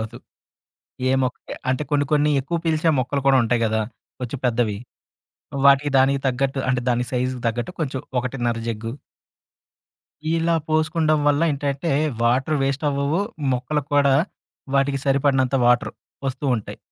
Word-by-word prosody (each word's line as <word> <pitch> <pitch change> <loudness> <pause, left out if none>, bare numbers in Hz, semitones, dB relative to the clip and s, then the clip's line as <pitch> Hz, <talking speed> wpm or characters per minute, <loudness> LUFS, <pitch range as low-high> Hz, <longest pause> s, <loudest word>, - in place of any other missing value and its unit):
అవ్వదు. 115 +2 -6 0.9
ఏ - - +3
మొక్క 125 - -2 0.3
అంటే 130 +3 0
కొన్ని 145 0 +2
కొన్ని 150 0 +3
ఎక్కువ 170 +6 -2
పీల్చే 160 0 +2
మొక్కలు 140 +2 -1
కూడా 135 -1 +6
ఉంటాయి 120 +1 +1
గదా! 110 0 +1 0.4
కొంచెం 125 +2 -5
పెద్దవి. 115 -4 +1 0.9
వాటికి 140 +1 +5
దానికి 135 +1 +3
తగ్గట్టు 135 +1 0
అంటే 125 -1 +1
దాని 125 0 +1
సైజుకి 125 0 -1
తగ్గట్టు 120 +8 -2
కొంచెం 135 -3 -2 0.2
ఒకటిన్నర 120 -2 -1
జగ్గు. 115 0 -3 1.5
ఇలా 165 0 +2
పోసుకుంటం 155 0 +2
వల్ల 145 +1 +2
ఏంటంటే 140 +2 -2 0.3
వాటర్ 130 +6 +2
వేస్ట్ 140 +2 -1
అవ్వవు. 140 +6 0 0.3
మొక్కలక్కూడా 140 +1 +1 0.6
వాటికి 135 0 +2
సరిపడినంత 135 -1 +2
వాటర్ 120 0 +3 0.4
వస్తూ 130 +3 -6
ఉంటాయి. 105 - -7
135 Hz, 130 wpm, -22 LUFS, 125-145 Hz, 1.5 s, కూడా